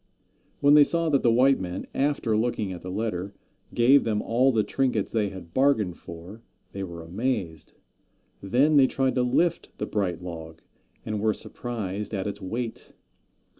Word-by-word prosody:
When 145 0 +6
they 150 0 +9
saw 165 +2 0
that 140 -3 +3
the 120 - +4
white 130 +4 +4
men, 90 0 -5
after 135 -5 0
looking 110 -3 -1
at 90 - -8
the 90 - -7
letter, 100 -1 -3 0.4
gave 130 +4 +5
them 105 -2 0
all 125 +5 +2
the 110 -3 +2
trinkets 120 -1 -1
they 105 -3 0
had 90 -4 -11
bargained 110 -10 +2
for, 85 +6 -10 0.3
they 100 - -6
were 85 -3 -6
amazed. 90 - -3 0.7
Then 135 +10 +3
they 135 -2 +6
tried 135 0 0
to 125 - +1
lift 165 +7 0
the - - -2
bright 90 -4 -2
log, 80 -2 -8 0.4
and 110 -1 -2
were 110 -1 +1
surprised 105 -3 -5
at 95 - -3
its 100 0 -5
weight. 115 +5 -5
110 Hz, 170 wpm, -26 LUFS, 95-130 Hz, 0.7 s, they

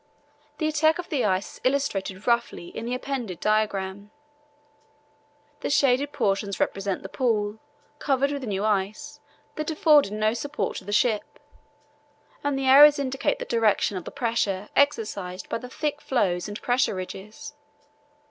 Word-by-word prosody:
The 310 - 0
attack 315 +1 +3
of 355 -1 -7
the 280 -7 0
ice 190 -1 -1
is - - -32
illustrated 215 -8 -1
roughly 235 -7 0
in - - -7
the 250 - -1
appended 255 -9 -4
diagram. 205 -2 -1 1.5
The - - -3
shaded 280 0 +2
portions 200 -3 -1
represent 195 -1 -1
the - - -5
pool, 215 -2 -1 0.4
covered 275 0 +1
with 285 -1 -3
new 200 -1 -2
ice 205 -1 -2 0.4
that 305 0 -2
afforded 300 - +4
no 215 +1 +1
support 285 +5 -3
to - - -8
the 205 - -5
ship, 210 0 +1 1.1
and 285 -1 0
the 270 - -2
arrows 290 +3 +8
indicate 270 -1 -1
the - - -5
direction 220 -3 +1
of 180 - -5
the - - -5
pressure 210 -5 -1
exercised 210 -10 0
by 230 - -2
the 250 - -9
thick 295 +1 -3
floes 185 -9 0
and 205 +1 -6
pressure 245 -4 +1
ridges. 195 +8 -8
230 Hz, 150 wpm, -25 LUFS, 200-280 Hz, 1.5 s, arrows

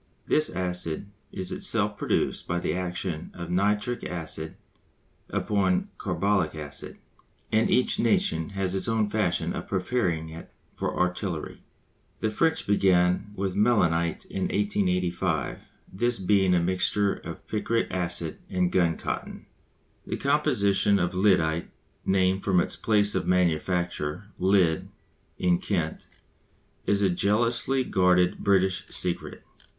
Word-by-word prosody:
This 155 0 +2
acid 90 0 -3 0.2
is 95 -1 -3
itself - - +1
produced - - -1
by 85 - -1
the 85 - -1
action 90 -2 -3
of 85 -1 -6
nitric 105 +6 0
acid 80 -2 -3 0.7
upon 95 -3 +1
carbolic 100 -6 0
acid, 75 -2 -6 0.5
and - - +3
each - - +2
nation 80 +1 +1
has 95 -1 0
its 95 - -2
own 110 -2 +1
fashion 105 -5 0
of - - -5
preparing 90 -5 -1
it 80 +1 -10 0.2
for - - -3
artillery. 90 -2 -2 0.6
The 110 - 0
French 160 +8 +1
began 95 -1 +2
with 95 -1 -2
mélinite 85 -7 +2
in 95 - -3
1885, 90 -5 -1 0.2
this 120 +5 +1
being 95 -1 +3
a - - +4
mixture 95 +3 +1
of - - -9
picric 115 +2 0
acid 85 -3 -2
and 90 -1 +1
gun 85 -3 +2
cotton. - - -5 0.6
The - - -2
composition 120 -9 +2
of 90 -1 0
lyddite 90 -4 +2 0.4
(named 95 0 +2
from 95 -3 +3
its - - 0
place 105 -1 +2
of - - -1
manufacture, 90 0 0
Lydd, 90 -4 +2 0.5
in 90 -1 +2
Kent) 85 -6 -2 0.8
is 100 0 +2
a 95 - +4
jealously 115 +8 +1
guarded 90 -4 +3
British 95 -2 +2
secret. 90 -1 -2
95 Hz, 125 wpm, -26 LUFS, 85-100 Hz, 0.8 s, a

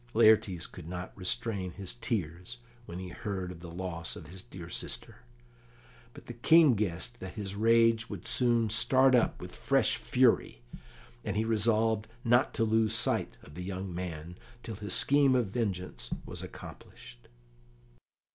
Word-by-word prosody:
Laertes 110 -6 +4
could 85 -3 -10
not 90 0 -6
restrain 95 0 -3
his 95 -1 -6
tears 95 -3 -4 0.3
when 85 - -7
he 90 0 -6
heard 95 -1 -5
of 90 - -10
the 85 0 -9
loss 85 -1 -5
of 80 - -10
his 90 +4 -10
dear 95 -6 -10
sister, 85 - -4 1.0
but - - -12
the 120 - -7
King 155 +4 +5
guessed 105 +2 -2
that 95 -1 -7
his 100 -2 -5
rage 115 +2 +3
would - - -7
soon 120 -2 +2
start 130 +3 +5
up 120 -2 +2
with - - -9
fresh - - +2
fury, - - +2 0.6
and 105 -2 -3
he 110 - +1
resolved 110 0 +1 0.2
not 120 +3 +3
to 115 - -1
lose 110 0 +2
sight - - 0
of 75 - -14
the 90 - -7
young 95 0 -5
man 85 -1 -6 0.2
till 115 - -6
his 105 -2 -1
scheme 140 -2 +4
of 120 -5 +1
vengeance 90 - -3 0.2
was - - -4
accomplished. - - -12
100 Hz, 155 wpm, -30 LUFS, 90-115 Hz, 1.0 s, King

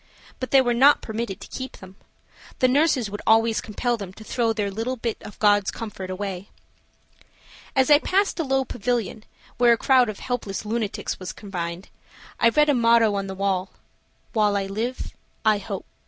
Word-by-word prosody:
But 255 - -4
they 270 - +6
were 245 -2 +1
not 275 +5 +5
permitted 220 -3 -4
to - - -9
keep 260 0 -6
them. 190 0 -13 0.6
The 255 - +3
nurses 260 -5 +2
would 205 - -5
always 225 0 +4
compel 235 +3 -2
them 195 -3 -8
to 220 - -12
throw 230 +1 0
their 210 -2 -2
little 225 +6 -3
bit 230 -2 -4
of 210 - -11
God's 205 -2 +3
comfort 205 -5 -6
away. 190 0 -5 1.3
As 265 +2 +3
I 290 - +8
passed 390 +3 0
a - - +1
low 270 -2 +1
pavilion, 225 -2 -3 0.3
where 240 -1 +6
a - - +1
crowd 255 -1 +4
of 210 - -5
helpless 225 -5 -4
lunatics 215 -1 -3
were 185 - -8
confined, 180 -3 -6 0.5
I 230 - +5
read 300 +5 +3
a - - +5
motto 230 -3 +4
on 195 -1 -2
the 190 - -6
wall, 190 -1 -1 0.6
"While 210 -3 +2
I 195 - -1
live 225 +6 -4 0.3
I 215 -1 +4
hope." 195 -1 -6
220 Hz, 185 wpm, -24 LUFS, 200-245 Hz, 1.3 s, I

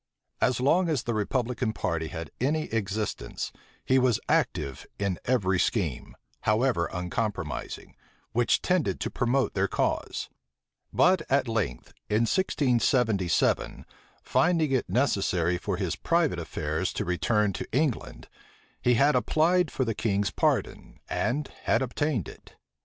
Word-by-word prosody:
As 125 -2 +2
long 165 +7 +3
as 145 -6 0
the 120 - -2
republican 115 +1 -1
party 80 -5 -2
had 80 -1 -7
any 155 +4 +1
existence, 105 - -3 0.3
he 130 0 +4
was 125 -3 +2
active 70 -2 0
in 100 -3 -1
every 95 -8 +2
scheme, 85 - -1 0.3
however 105 -4 +1
unpromising, 90 -3 -4 0.4
which 120 +1 +2
tended 180 -4 +1
to - - -3
promote 130 +2 +1
their - - +1
cause; - - -1 0.6
but 185 -1 +4
at 135 -1 +2
length, 115 -5 -2 0.2
in 105 +2 +2
1677, 120 - +1 0.4
finding 165 -4 +2
it 130 -2 0
necessary 90 -9 +1
for - - -2
his - - -1
private - - +1
affairs - - -2
to - - -2
return 105 +3 +1
to - - -6
England, 135 -1 -1 0.5
he 125 0 +3
had 140 +4 +4
applied 165 +6 +3
for 130 - -1
the 115 - -1
king's 100 -2 0
pardon, - - -1
and 145 +4 -1 0.2
had 115 - +3
obtained 130 - -1
it. - - -13
120 Hz, 130 wpm, -27 LUFS, 100-135 Hz, 0.6 s, he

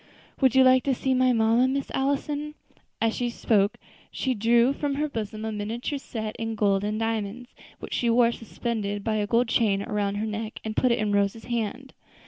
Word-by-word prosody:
Would 265 -2 +4
you 265 - +7
like 255 0 +6
to 270 -2 +2
see 265 +2 0
my 255 0 +3
mamma, 230 +2 +3
Miss 275 +1 -2
Allison?" 280 +2 0
And 300 0 -8 0.6
as - - -7
she 245 -1 -1
spoke 210 -3 +1 0.3
she 260 - -1
drew 235 +3 +3
from 285 -1 -2
her 300 +2 0
bosom 215 -4 -5
a 220 - -2
miniature 225 +7 -3
set 220 -5 -5
in 225 0 -3
gold 200 -2 +2
and 210 +1 -2
diamonds, 225 +2 -3 0.2
which - - -8
she 240 - +1
wore 235 0 +4
suspended 215 -3 -4
by 220 0 0
a 205 -1 -1
gold 235 +3 +2
chain 205 -4 +2
around 205 -3 -1
her 210 +2 -2
neck, 220 0 -5
and 220 -1 -4
put 255 - +3
it 235 - +2
in 210 -1 0
Rose's 200 +2 0
hand. 240 +3 -3
230 Hz, 205 wpm, -26 LUFS, 215-255 Hz, 0.6 s, you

